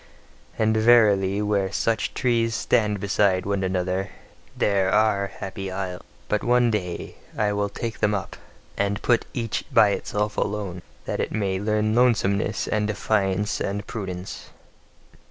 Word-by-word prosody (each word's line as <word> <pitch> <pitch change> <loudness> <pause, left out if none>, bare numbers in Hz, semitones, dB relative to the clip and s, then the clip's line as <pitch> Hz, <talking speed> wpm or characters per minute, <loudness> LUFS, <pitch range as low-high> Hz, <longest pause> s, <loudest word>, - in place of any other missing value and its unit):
And 110 0 +2
verily, 105 -3 +4
where 100 -2 0
such 115 +1 -1
trees 115 -3 +1
stand 105 -3 +1
beside 100 -2 +1
one 100 -1 -1
another, 95 +1 -1 0.5
there 95 -2 +2
ARE 105 -1 +2
Happy 95 -1 -6
Isles! 95 -1 -4 0.3
But - - 0
one 120 -1 +3
day 90 -5 -4 0.2
will 105 -1 +1
I - - -11
take 115 -2 -4
them 105 0 +2
up, 100 - -5 0.4
and 100 0 0
put 120 -2 +2
each 115 -4 -2
by 105 - +6
itself 105 +1 -2
alone: 100 -4 -2 0.2
that - - -3
it - - -1
may 100 -3 -1
learn 105 +1 0
lonesomeness 110 -3 +2
and 105 -1 0
defiance 105 -1 0
and 100 +1 -2
prudence. 95 -5 -6
105 Hz, 140 wpm, -24 LUFS, 95-110 Hz, 0.5 s, by